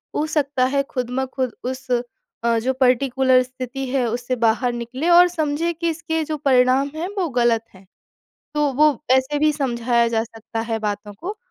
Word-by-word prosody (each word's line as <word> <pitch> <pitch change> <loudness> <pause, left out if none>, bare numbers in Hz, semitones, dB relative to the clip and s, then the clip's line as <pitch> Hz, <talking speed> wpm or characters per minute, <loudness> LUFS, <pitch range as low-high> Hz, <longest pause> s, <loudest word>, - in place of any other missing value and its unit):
हो 300 - +1
सकता 280 -4 +1
है 275 +2 +1
खुद 250 -2 -3
ब 265 - 0
खुद 260 -3 -1
उस 260 +1 -5 0.6
अ, 235 0 +2
जो 260 +3 0
पर्टिकुलर 260 0 +3
स्थिति 255 +1 -6
है 260 -1 +1
उससे 245 +2 -2
बाहर 235 +1 +1
निकलें 255 +7 -3
और 350 +1 +8
समझें 330 0 -1
कि 335 +1 -2
इसके 320 0 -2
जो 305 0 -3
परिणाम 265 0 +3
हैं 330 +3 -3
वो 370 -3 +1
गलत 235 -2 +3
हैं। 190 +1 -17 0.7
तो 295 -2 +1
वो 300 +3 +5 0.2
ऐसे 265 +3 +2
भी 305 +1 +4
समझाया 240 -4 +1
जा 225 -1 0
सकता 225 0 -7
है 225 -1 -2
बातों 205 -1 -4
को। 405 +4 -5
260 Hz, 185 wpm, -21 LUFS, 240-295 Hz, 0.7 s, और